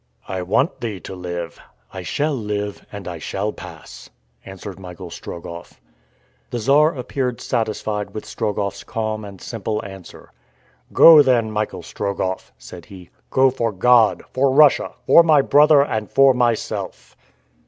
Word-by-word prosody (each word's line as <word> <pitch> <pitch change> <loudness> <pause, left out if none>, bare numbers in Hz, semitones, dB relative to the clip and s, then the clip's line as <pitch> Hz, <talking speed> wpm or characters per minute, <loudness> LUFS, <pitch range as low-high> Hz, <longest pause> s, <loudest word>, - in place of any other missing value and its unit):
"I 95 -1 -4
want 115 - 0
thee 110 -5 -4
to 95 - -8
live." 85 -2 -6 0.3
"I - - -6
shall 150 +1 -1
live, 105 -4 -4
and 100 -2 -8
I 85 -2 -6
shall - - -3
pass," - - -12 0.3
answered 95 -1 -10
Michael 90 -1 -10
Strogoff. 85 +1 -9 0.7
The 120 - -4
Czar 145 +7 +3
appeared 125 -1 -3
satisfied 110 -3 -3
with 110 - -6
Strogoff's 105 -3 -3
calm 110 -1 -4
and 100 -2 -10
simple 110 0 -4
answer. 95 -2 -12 0.6
"Go 160 -2 +9
then, 120 -5 +2
Michael 105 -4 -3
Strogoff," 95 0 -4
said 85 -2 -12
he, 90 -3 -13 0.2
"go 130 0 +3
for 115 -3 -2
God, 115 +3 +3
for 135 +1 +2
Russia, 145 +1 +4
for - - +7
my 155 -4 +4
brother, 145 0 +5
and 110 -6 -3
for 135 -1 +5
myself!" 120 -2 -2
110 Hz, 145 wpm, -20 LUFS, 95-130 Hz, 0.7 s, Go